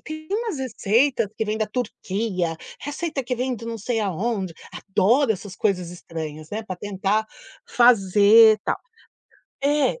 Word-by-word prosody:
tem 310 Hz, 0 st, -8 dB
umas 430 Hz, -, -2 dB
receitas 235 Hz, -1 st, +1 dB
que 220 Hz, -, -1 dB
vêm 215 Hz, 0 st, -2 dB
da 215 Hz, -, 0 dB
Turquia, 195 Hz, -7 st, -2 dB, 0.2 s
receita 290 Hz, -1 st, -4 dB
que 250 Hz, +1 st, -1 dB
vêm 255 Hz, +1 st, -1 dB
de 230 Hz, -, -10 dB
não 230 Hz, -1 st, -4 dB
sei 225 Hz, +2 st, -1 dB
aonde, 195 Hz, -2 st, -2 dB, 0.2 s
adoro 225 Hz, +6 st, +2 dB
essas 195 Hz, -1 st, -8 dB
coisas 180 Hz, -5 st, 0 dB
estranhas, 155 Hz, -3 st, -7 dB
né, 220 Hz, +2 st, -3 dB
para 185 Hz, -4 st, -6 dB
tentar 205 Hz, +2 st, -1 dB, 0.4 s
fazer, 215 Hz, -1 st, +6 dB
tal. -, -, 0 dB, 0.9 s
É, 295 Hz, -, +2 dB
220 Hz, 145 wpm, -23 LUFS, 195-250 Hz, 0.9 s, fazer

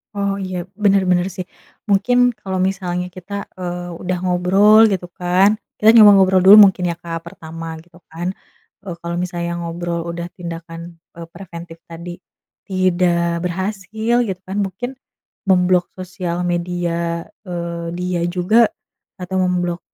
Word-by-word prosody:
Oh 200 Hz, -1 st, 0 dB
iya, 185 Hz, -1 st, -4 dB, 0.3 s
bener 200 Hz, -1 st, +4 dB
bener 175 Hz, +1 st, +2 dB
sih. 185 Hz, -, -4 dB, 0.5 s
Mungkin 245 Hz, +5 st, +2 dB, 0.2 s
kalau 190 Hz, -2 st, -5 dB
misalnya 180 Hz, -2 st, -3 dB
kita, 185 Hz, +3 st, -11 dB, 0.3 s
eee, 175 Hz, 0 st, -5 dB
udah 180 Hz, 0 st, -2 dB
ngobrol 195 Hz, +5 st, +5 dB
gitu 180 Hz, -2 st, -2 dB
kan 190 Hz, +4 st, +3 dB, 0.2 s
kita 215 Hz, +1 st, +5 dB
coba 215 Hz, -3 st, +9 dB
ngobrol 190 Hz, -1 st, +4 dB
dulu 190 Hz, +3 st, +9 dB
mungkin 180 Hz, -1 st, -3 dB
ya, 170 Hz, -, -2 dB
Kak 170 Hz, -1 st, -6 dB
pertama 165 Hz, 0 st, -8 dB
gitu 175 Hz, 0 st, -20 dB
kan 175 Hz, +3 st, -4 dB, 0.5 s
e -, -, -13 dB
kalau 170 Hz, 0 st, -4 dB
misalnya 170 Hz, -1 st, -3 dB
ngobrol 170 Hz, 0 st, -4 dB
udah 170 Hz, 0 st, -5 dB
tindakan 170 Hz, 0 st, -8 dB, 0.2 s
e -, -, -10 dB
preventif 170 Hz, -3 st, -10 dB
tadi 170 Hz, +1 st, -8 dB, 0.5 s
tidak 175 Hz, -2 st, +1 dB
berhasil 200 Hz, +5 st, -2 dB
gitu 185 Hz, -2 st, -5 dB
kan 195 Hz, +2 st, -4 dB
mungkin 195 Hz, +6 st, -5 dB, 0.6 s
memblok 180 Hz, -1 st, +3 dB
sosial 180 Hz, -1 st, -4 dB
media, 170 Hz, -1 st, -2 dB, 0.2 s
eee, 170 Hz, -1 st, -4 dB
dia 180 Hz, -1 st, -2 dB
juga 215 Hz, +6 st, +3 dB, 0.5 s
atau 180 Hz, +1 st, -5 dB
memblok 175 Hz, -1 st, -1 dB
180 Hz, 140 wpm, -19 LUFS, 170-190 Hz, 0.6 s, coba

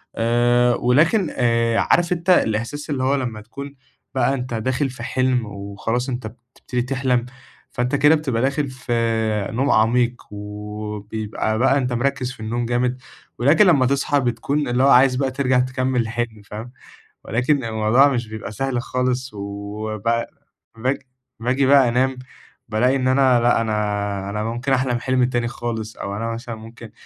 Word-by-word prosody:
آآ، 120 Hz, +1 st, +3 dB
ولكن 155 Hz, -, +3 dB
آآ، 115 Hz, -2 st, +2 dB
عارف 175 Hz, 0 st, +2 dB
أنت 175 Hz, +1 st, -4 dB
الإحساس 135 Hz, -1 st, +1 dB
اللي 135 Hz, -3 st, -1 dB
هو 135 Hz, +2 st, +2 dB
لمَّا 120 Hz, -6 st, -3 dB
تكون 140 Hz, +5 st, -9 dB, 0.4 s
بقى 135 Hz, +1 st, +2 dB
أنت 125 Hz, -2 st, -4 dB
داخل 130 Hz, +5 st, -1 dB
في 125 Hz, -2 st, -9 dB
حلم 130 Hz, -2 st, 0 dB
وخلاص 105 Hz, +5 st, -3 dB
أنت 120 Hz, -3 st, -4 dB
بتبتدي 120 Hz, +2 st, -6 dB
تحلم، 125 Hz, -1 st, 0 dB, 0.5 s
فأنت 125 Hz, +3 st, -1 dB
كده 145 Hz, +3 st, +5 dB
بتبقى 135 Hz, -7 st, -1 dB
داخل 140 Hz, +1 st, 0 dB
في 125 Hz, -2 st, -5 dB, 0.6 s
نوم 130 Hz, +5 st, +1 dB
عميق، 120 Hz, +2 st, +3 dB, 0.2 s
وبيبقى 105 Hz, +1 st, -4 dB
بقى 135 Hz, +2 st, +4 dB
أنت 125 Hz, -3 st, -1 dB
مركِّز 130 Hz, +1 st, -1 dB
في -, -, -13 dB
النوم 115 Hz, +2 st, -2 dB
جامد، 125 Hz, +1 st, 0 dB, 0.4 s
ولكن 145 Hz, -, +5 dB
لمَّا 140 Hz, -7 st, +5 dB
تصحى 140 Hz, +2 st, +1 dB
بتكون 135 Hz, +3 st, -1 dB
اللي 125 Hz, +2 st, +1 dB
هو 140 Hz, -, +5 dB
عايز 130 Hz, 0 st, +6 dB
بقى 130 Hz, 0 st, 0 dB
ترجع 130 Hz, -1 st, +1 dB
تكمِّل 130 Hz, 0 st, 0 dB
الحلم، 115 Hz, -1 st, -3 dB
فاهم، 110 Hz, +4 st, -8 dB, 0.5 s
ولكن 130 Hz, +4 st, +1 dB
الموضوع 110 Hz, +4 st, +4 dB
مش 120 Hz, -4 st, -1 dB
بيبقى 110 Hz, -1 st, -7 dB
سهل 125 Hz, +2 st, -2 dB
خالص. 125 Hz, +1 st, -2 dB
و 100 Hz, +2 st, -5 dB
ب 115 Hz, +3 st, 0 dB, 0.5 s
باج 130 Hz, +4 st, 0 dB, 0.4 s
باجي 125 Hz, +4 st, +1 dB
بقى 135 Hz, -2 st, +6 dB
أنام، 130 Hz, +2 st, +1 dB, 0.5 s
بالاقي 120 Hz, +5 st, +2 dB
إن 130 Hz, -1 st, 0 dB
أنا 130 Hz, -1 st, +4 dB
لا 120 Hz, 0 st, +3 dB
أنا 105 Hz, -2 st, -2 dB
أنا 105 Hz, +1 st, -3 dB
ممكن 120 Hz, +4 st, -2 dB
أحلم 125 Hz, -2 st, +1 dB
حلم 130 Hz, 0 st, +1 dB
تاني 120 Hz, -1 st, 0 dB
خالص 115 Hz, -2 st, -5 dB
أو 100 Hz, 0 st, -4 dB
أنا 115 Hz, +1 st, -2 dB
مثلًا 115 Hz, 0 st, -6 dB
ممكن 115 Hz, 0 st, -12 dB
125 Hz, 160 wpm, -21 LUFS, 115-130 Hz, 0.6 s, عايز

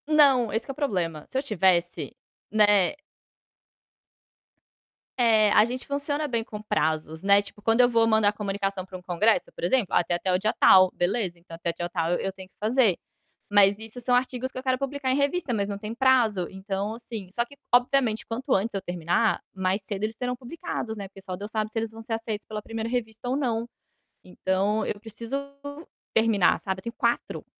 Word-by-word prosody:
Não, 275 Hz, -7 st, +5 dB
esse 225 Hz, +1 st, -2 dB
que -, -, -5 dB
é -, -, -6 dB
o -, -, -23 dB
problema. 175 Hz, -, -2 dB
Se 260 Hz, -, -4 dB
eu 265 Hz, -, 0 dB
tivesse, 185 Hz, -, +1 dB, 0.4 s
né. 205 Hz, -4 st, +4 dB, 2.2 s
É, 220 Hz, -4 st, +4 dB
a 210 Hz, -, +6 dB
gente 250 Hz, +2 st, -4 dB
funciona 285 Hz, +1 st, -1 dB
bem 235 Hz, -4 st, -1 dB
com 210 Hz, -2 st, -8 dB
prazos, 160 Hz, -6 st, -1 dB
né. 200 Hz, 0 st, +6 dB
Tipo, 205 Hz, +1 st, -11 dB
quando 225 Hz, +3 st, +4 dB
eu 245 Hz, -, +5 dB
vou 230 Hz, -1 st, +3 dB
mandar 220 Hz, -2 st, +3 dB
comunicação 195 Hz, -2 st, -3 dB
para 185 Hz, 0 st, -8 dB
um -, -, -14 dB
congresso, 185 Hz, +5 st, +1 dB
por -, -, -10 dB
exemplo: 220 Hz, +4 st, +2 dB
"Ah, 175 Hz, -, +4 dB
tem 175 Hz, -, -1 dB
até 185 Hz, +2 st, -1 dB
o -, -, +4 dB
dia 215 Hz, +3 st, 0 dB
tal. 185 Hz, -1 st, +7 dB
Beleza, 180 Hz, -1 st, -1 dB
então 170 Hz, -1 st, -11 dB
até 170 Hz, +1 st, -3 dB
o -, -, -14 dB
dia 175 Hz, +1 st, -4 dB
tal 165 Hz, -2 st, -1 dB
eu -, -, 0 dB
eu 195 Hz, -, -2 dB
tenho 190 Hz, -1 st, -12 dB
que -, -, -45 dB
fazer", 220 Hz, -3 st, +3 dB, 0.5 s
mas 200 Hz, 0 st, +5 dB
isso 225 Hz, +2 st, -7 dB
são 245 Hz, +1 st, +2 dB
artigos 255 Hz, +1 st, -1 dB
que -, -, -10 dB
eu -, -, -9 dB
quero 260 Hz, -1 st, +1 dB
publicar 275 Hz, -1 st, -2 dB
em -, -, +2 dB
revista, 285 Hz, -1 st, 0 dB
mas 200 Hz, -3 st, 0 dB
não 200 Hz, -, -3 dB
tem 210 Hz, +1 st, -5 dB
prazo. 235 Hz, -8 st, +3 dB
Então, 195 Hz, +2 st, -3 dB
assim, 225 Hz, -5 st, -8 dB
só 235 Hz, +4 st, 0 dB
que 280 Hz, +3 st, -17 dB, 0.2 s
obviamente 245 Hz, -2 st, +3 dB
quanto 255 Hz, +4 st, -2 dB
antes 210 Hz, +4 st, 0 dB
eu 195 Hz, -, -1 dB
terminar, 175 Hz, +4 st, 0 dB
mais 190 Hz, +1 st, 0 dB
cedo 200 Hz, +1 st, -2 dB
eles 220 Hz, +1 st, -5 dB
serão 250 Hz, -1 st, -2 dB
publicados, 245 Hz, -4 st, -5 dB
né. 200 Hz, -1 st, -6 dB
Porque 195 Hz, 0 st, -14 dB
só 190 Hz, -1 st, -5 dB
Deus 205 Hz, +3 st, -8 dB
sabe 215 Hz, -1 st, -1 dB
se -, -, -6 dB
eles 225 Hz, -1 st, -3 dB
vão 225 Hz, 0 st, -10 dB
ser 225 Hz, -, -4 dB
aceitos 225 Hz, -2 st, -4 dB
pela 215 Hz, -1 st, -5 dB
1ª 225 Hz, +1 st, -5 dB
revista 235 Hz, -1 st, -3 dB
ou 260 Hz, -, +1 dB
não. 235 Hz, -4 st, -1 dB, 0.6 s
Então 195 Hz, +4 st, 0 dB
eu 205 Hz, -, -3 dB
preciso 225 Hz, +3 st, -7 dB, 0.8 s
terminar, 220 Hz, -4 st, +3 dB
sabe. 190 Hz, -1 st, -3 dB
Eu -, -, -37 dB
tenho 235 Hz, 0 st, -6 dB
4 235 Hz, 0 st, -1 dB
215 Hz, 210 wpm, -26 LUFS, 195-245 Hz, 2.2 s, tal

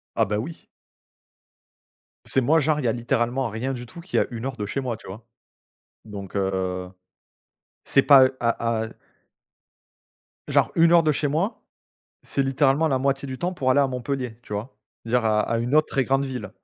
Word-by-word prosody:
Ah -, -, +3 dB
bah 105 Hz, +2 st, -2 dB
oui. 155 Hz, +10 st, -7 dB, 1.6 s
C'est 135 Hz, -, +2 dB
moi 155 Hz, +6 st, +3 dB
genre 150 Hz, +1 st, +1 dB
il 150 Hz, -, -3 dB
y -, -, +2 dB
a -, -, +2 dB
littéralement 120 Hz, +2 st, -1 dB
rien 115 Hz, +5 st, -3 dB
du 125 Hz, -2 st, -6 dB
tout 145 Hz, +8 st, -11 dB
qui 175 Hz, -, -4 dB
est -, -, +5 dB
à -, -, +1 dB
1 120 Hz, -1 st, -6 dB
heure 135 Hz, -2 st, -4 dB
de 105 Hz, -3 st, -4 dB
chez 135 Hz, -, -2 dB
moi, 125 Hz, -4 st, -3 dB
tu -, -, -16 dB
vois? 110 Hz, +5 st, -10 dB, 0.8 s
Donc, 100 Hz, -3 st, -8 dB
heu, 95 Hz, -2 st, -2 dB, 0.9 s
c'est 140 Hz, -, +3 dB
pas 135 Hz, -2 st, +7 dB
à 115 Hz, -1 st, 0 dB
à -, -, -8 dB, 1.6 s
genre -, -, +2 dB
1 165 Hz, 0 st, +5 dB
heure 170 Hz, -1 st, +7 dB
de 155 Hz, -1 st, +2 dB
chez 145 Hz, +1 st, -1 dB
moi, 165 Hz, -, -1 dB, 0.6 s
c'est 140 Hz, -, -1 dB
littéralement 135 Hz, +3 st, +2 dB
la 135 Hz, -3 st, +1 dB
moitié 140 Hz, +1 st, 0 dB
du 130 Hz, -1 st, -6 dB
temps 180 Hz, +1 st, -1 dB
pour 135 Hz, -7 st, 0 dB
aller 135 Hz, +2 st, +4 dB
à 140 Hz, -, +3 dB
Montpellier, 125 Hz, -2 st, -4 dB
tu 105 Hz, -, -11 dB
vois? 105 Hz, +3 st, -5 dB, 0.3 s
Dire 115 Hz, +1 st, +1 dB
à 110 Hz, -1 st, +3 dB
à 115 Hz, +2 st, 0 dB
une 120 Hz, +4 st, -1 dB
autre 155 Hz, 0 st, +5 dB
très 135 Hz, -, 0 dB
grande 135 Hz, +1 st, +1 dB
ville, 125 Hz, -7 st, -5 dB
130 Hz, 200 wpm, -24 LUFS, 115-140 Hz, 1.6 s, pas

